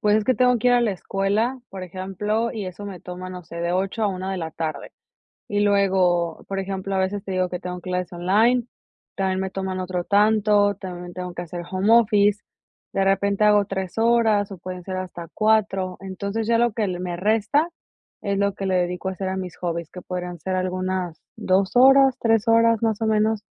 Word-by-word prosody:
Pues, 210 Hz, 0 st, +3 dB
es 215 Hz, -, 0 dB
que 255 Hz, -, +3 dB
tengo 250 Hz, +1 st, +3 dB
que 250 Hz, +2 st, +2 dB
ir -, -, +4 dB
a 245 Hz, -, +4 dB
la 230 Hz, -, +2 dB
escuela, 200 Hz, +7 st, -1 dB
por 190 Hz, -1 st, -8 dB
ejemplo, 195 Hz, +5 st, -2 dB
y 210 Hz, -4 st, -4 dB
eso 185 Hz, +3 st, -8 dB
me 190 Hz, -3 st, -8 dB
toma, 180 Hz, +1 st, -7 dB
no 180 Hz, -1 st, -8 dB
sé, 170 Hz, 0 st, -10 dB
de 170 Hz, +1 st, -1 dB
8 195 Hz, +4 st, -1 dB
a -, -, +3 dB
1 190 Hz, 0 st, -4 dB
de 190 Hz, -, -2 dB
la 165 Hz, -2 st, -4 dB
tarde. 155 Hz, -3 st, -5 dB, 0.6 s
Y 205 Hz, -, 0 dB
luego, 185 Hz, -4 st, +2 dB
por 195 Hz, -, -4 dB
ejemplo, 195 Hz, 0 st, -3 dB
a 190 Hz, -, +1 dB
veces 195 Hz, +2 st, -1 dB
te 195 Hz, -, -6 dB
digo 185 Hz, -1 st, 0 dB
que 180 Hz, -, -4 dB
tengo 180 Hz, 0 st, -5 dB
clases 180 Hz, 0 st, -3 dB
online, 215 Hz, +8 st, +2 dB, 0.5 s
también 190 Hz, -1 st, 0 dB
me 190 Hz, -, -2 dB
toman 190 Hz, -1 st, -4 dB
otro 180 Hz, -1 st, -2 dB
tanto, 205 Hz, 0 st, +3 dB
también 180 Hz, -2 st, -7 dB
me 175 Hz, -, -10 dB
tengo 180 Hz, 0 st, -6 dB
que 175 Hz, -, -5 dB
hacer 175 Hz, +1 st, -6 dB
home 190 Hz, +3 st, +1 dB
office. 210 Hz, -3 st, +4 dB, 0.5 s
De 195 Hz, -, +1 dB
repente 200 Hz, +1 st, +2 dB
hago 210 Hz, -1 st, +5 dB
3 190 Hz, -1 st, -4 dB
horas, 225 Hz, -3 st, +3 dB
o -, -, -9 dB
pueden 180 Hz, +1 st, -7 dB
ser 185 Hz, +1 st, -5 dB
hasta 180 Hz, -2 st, -6 dB
4. 210 Hz, -4 st, +1 dB
Entonces, 200 Hz, +3 st, -4 dB
ya 230 Hz, 0 st, +3 dB
lo 240 Hz, 0 st, +3 dB
que 215 Hz, -2 st, -1 dB
le 180 Hz, -1 st, -3 dB
me 180 Hz, -1 st, -3 dB
resta 220 Hz, -, +2 dB, 0.5 s
es 200 Hz, -1 st, -1 dB
lo 200 Hz, 0 st, +1 dB
que 195 Hz, -, -4 dB
le 190 Hz, -1 st, +1 dB
dedico 180 Hz, +1 st, -1 dB
a -, -, -3 dB
hacer 190 Hz, 0 st, -4 dB
a 190 Hz, -, -2 dB
mis 185 Hz, -2 st, -5 dB
hobbies, 170 Hz, -2 st, -3 dB
que 180 Hz, -, -9 dB
podrían 180 Hz, -1 st, -5 dB
ser 185 Hz, +4 st, -2 dB
algunas 185 Hz, -2 st, -2 dB, 0.2 s
2 190 Hz, +2 st, +1 dB
horas, 270 Hz, +1 st, +6 dB
3 225 Hz, -1 st, +2 dB
horas, 230 Hz, 0 st, +4 dB
más 220 Hz, -1 st, 0 dB
o 225 Hz, -, +1 dB
menos. 215 Hz, 0 st, +2 dB
195 Hz, 220 wpm, -23 LUFS, 185-215 Hz, 0.6 s, horas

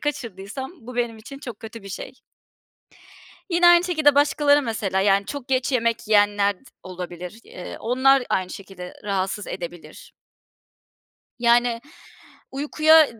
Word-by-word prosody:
kaçırdıysam 235 Hz, -3 st, -5 dB
bu 250 Hz, +2 st, -10 dB
benim 235 Hz, -2 st, -1 dB
için 275 Hz, +5 st, -10 dB
çok 245 Hz, -7 st, -8 dB
kötü 225 Hz, -1 st, -9 dB
bir 195 Hz, -, -10 dB
şey. 195 Hz, -, -7 dB, 1.4 s
Yine 350 Hz, 0 st, +4 dB
aynı 345 Hz, 0 st, +7 dB
şekilde 310 Hz, -5 st, +3 dB
başkaları, 290 Hz, 0 st, +4 dB
mesela, 210 Hz, -6 st, -1 dB
yani, 200 Hz, 0 st, +3 dB
çok 285 Hz, -2 st, -6 dB
geç 260 Hz, +1 st, +1 dB
yemek 230 Hz, -2 st, 0 dB
yiyenler 205 Hz, -1 st, +4 dB
d -, -, -28 dB, 0.2 s
olabilir. 180 Hz, +2 st, -8 dB
Eee, 180 Hz, -, -9 dB
onlar 260 Hz, +3 st, +4 dB
aynı 185 Hz, -1 st, 0 dB
şekilde, 190 Hz, -2 st, -9 dB
eee, -, -, -10 dB
rahatsız 195 Hz, 0 st, -2 dB
edebilir. 175 Hz, -2 st, -8 dB, 1.3 s
Yani, 240 Hz, 0 st, +3 dB, 0.7 s
uykuya 310 Hz, +3 st, +5 dB
d 230 Hz, -, -13 dB
230 Hz, 135 wpm, -23 LUFS, 195-275 Hz, 1.4 s, aynı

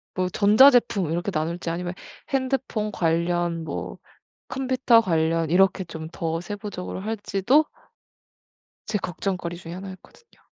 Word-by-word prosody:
뭐 185 Hz, -1 st, 0 dB
전자제품 215 Hz, -, +5 dB
이렇게 175 Hz, +4 st, -1 dB
나눌지 165 Hz, +2 st, -2 dB
아니면 175 Hz, +1 st, -3 dB, 0.4 s
핸드폰 260 Hz, -5 st, -1 dB
관련 170 Hz, 0 st, 0 dB
뭐 -, -, -5 dB, 0.5 s
컴퓨터 255 Hz, -3 st, +3 dB
관련 165 Hz, -3 st, +1 dB
이렇게 190 Hz, +2 st, +3 dB
좀 160 Hz, -1 st, -7 dB
더 165 Hz, -1 st, -3 dB
세부적으로 205 Hz, -1 st, -6 dB
할지도 220 Hz, +6 st, +2 dB, 1.2 s
제 215 Hz, -1 st, -1 dB
걱정거리 180 Hz, -1 st, -3 dB
중에 170 Hz, 0 st, -9 dB
하나였거든요. 195 Hz, -, -12 dB
185 Hz, 290 characters per minute, -24 LUFS, 170-220 Hz, 1.2 s, 전자제품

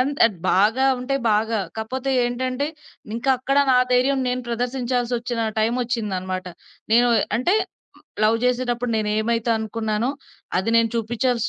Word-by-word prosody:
అంత్ 280 Hz, +3 st, 0 dB
అద్ 215 Hz, -5 st, -4 dB
బాగా 220 Hz, +7 st, +3 dB
ఉంటే 250 Hz, +2 st, -2 dB, 0.2 s
బాగా. 220 Hz, +1 st, +1 dB, 0.2 s
కాపోతే 255 Hz, +5 st, -3 dB
ఏంటంటే 255 Hz, +3 st, -1 dB, 0.5 s
ఇంకక్కడ 265 Hz, +3 st, 0 dB
నా 255 Hz, -, +5 dB, 0.2 s
ధైర్యం 260 Hz, +2 st, +3 dB
నేను 250 Hz, 0 st, -2 dB
ప్రదర్శించాల్సొచ్చిన 245 Hz, -1 st, -2 dB, 0.2 s
టైమొచ్చిందనమాట. 215 Hz, -6 st, -1 dB, 0.5 s
నేను 240 Hz, +2 st, +5 dB, 0.3 s
అంటే 300 Hz, -, +2 dB, 0.4 s
మ్ -, -, -24 dB, 0.2 s
లవ్ 220 Hz, +1 st, +4 dB
జేసేటప్పుడు 245 Hz, -1 st, 0 dB
నేనేమైతే 220 Hz, +2 st, 0 dB
అనుకున్నానో 220 Hz, +2 st, -2 dB, 0.5 s
అది 190 Hz, +5 st, 0 dB
నేను 230 Hz, 0 st, +4 dB
చూపిచ్చాల్సి 235 Hz, +1 st, 0 dB
240 Hz, 120 wpm, -22 LUFS, 220-255 Hz, 0.5 s, నా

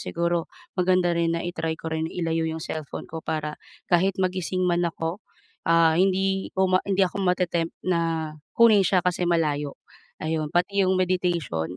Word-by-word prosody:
Siguro, 170 Hz, 0 st, -1 dB, 0.3 s
maganda 180 Hz, -1 st, +3 dB
rin 170 Hz, 0 st, +1 dB
na 170 Hz, -, -3 dB
i-try 165 Hz, -2 st, -3 dB
ko 160 Hz, -, -5 dB
rin 160 Hz, 0 st, -1 dB
ilayo 165 Hz, -1 st, -1 dB
yung 160 Hz, 0 st, -4 dB
cellphone 155 Hz, -4 st, -5 dB
ko 160 Hz, 0 st, -6 dB
para 155 Hz, -1 st, -2 dB, 0.4 s
kahit 185 Hz, +2 st, +3 dB
magising 185 Hz, 0 st, -1 dB
man 175 Hz, -1 st, +2 dB
ako, 165 Hz, +4 st, -4 dB, 0.5 s
ah, 165 Hz, -1 st, +5 dB
hindi 190 Hz, 0 st, +1 dB
ko 190 Hz, 0 st, +3 dB, 0.2 s
hindi 195 Hz, 0 st, +3 dB
ako 195 Hz, +2 st, -3 dB
mate-tempt 175 Hz, -2 st, 0 dB
na 165 Hz, -3 st, 0 dB, 0.2 s
kunin 225 Hz, -3 st, +7 dB
siya 185 Hz, 0 st, +3 dB
kasi 180 Hz, 0 st, +1 dB
malayo. 150 Hz, -4 st, 0 dB, 0.5 s
Ayun, 155 Hz, -1 st, -1 dB
pati 195 Hz, +3 st, +1 dB
yung 185 Hz, 0 st, +2 dB
meditation, 170 Hz, -, -1 dB
170 Hz, 160 wpm, -25 LUFS, 160-185 Hz, 0.5 s, kunin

